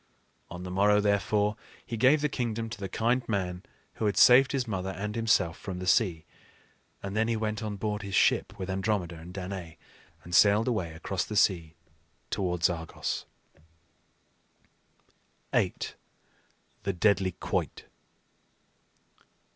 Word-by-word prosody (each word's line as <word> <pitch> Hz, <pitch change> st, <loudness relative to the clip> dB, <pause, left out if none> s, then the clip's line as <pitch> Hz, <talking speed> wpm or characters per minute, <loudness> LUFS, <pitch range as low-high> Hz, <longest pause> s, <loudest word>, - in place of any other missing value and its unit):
On 90 Hz, +1 st, -7 dB
the 90 Hz, -, -6 dB
morrow 105 Hz, +2 st, +4 dB
therefore, 105 Hz, +1 st, +1 dB, 0.3 s
he 115 Hz, -, -4 dB
gave 130 Hz, +6 st, +4 dB
the 150 Hz, -, +2 dB
kingdom 115 Hz, -4 st, -3 dB
to -, -, -7 dB
the 100 Hz, -1 st, -4 dB
kind 120 Hz, +6 st, +1 dB
man 90 Hz, -4 st, -1 dB, 0.4 s
who 110 Hz, -, 0 dB
had 100 Hz, -1 st, -1 dB
saved 130 Hz, +4 st, +7 dB
his 130 Hz, -3 st, -1 dB
mother 95 Hz, -3 st, -3 dB
and 105 Hz, +3 st, -4 dB
himself 115 Hz, -7 st, +2 dB
from 95 Hz, -2 st, -6 dB
the 90 Hz, -, -5 dB
sea; 90 Hz, -5 st, +2 dB, 0.8 s
and 100 Hz, +1 st, -5 dB
then 110 Hz, +1 st, +2 dB
he 115 Hz, -1 st, 0 dB
went 110 Hz, 0 st, -2 dB
on 105 Hz, -2 st, -3 dB
board 105 Hz, +1 st, -3 dB
his 100 Hz, -2 st, -4 dB
ship, -, -, +2 dB
with 95 Hz, -, -5 dB
Andromeda 95 Hz, -3 st, -1 dB
and 85 Hz, +2 st, -10 dB
Danaë, 90 Hz, -3 st, -6 dB, 0.5 s
and 90 Hz, -, -10 dB
sailed 105 Hz, +5 st, +5 dB
away 95 Hz, -10 st, -1 dB
across 85 Hz, +3 st, -2 dB
the 105 Hz, -, -6 dB
sea 85 Hz, -6 st, +2 dB, 0.6 s
towards 90 Hz, -3 st, +1 dB
Argos. 80 Hz, -2 st, -4 dB, 2.3 s
VIII. -, -, +2 dB, 1.1 s
THE 100 Hz, -, -2 dB
DEADLY 95 Hz, 0 st, +2 dB
QUOIT. -, -, -3 dB
100 Hz, 140 wpm, -28 LUFS, 90-110 Hz, 2.3 s, saved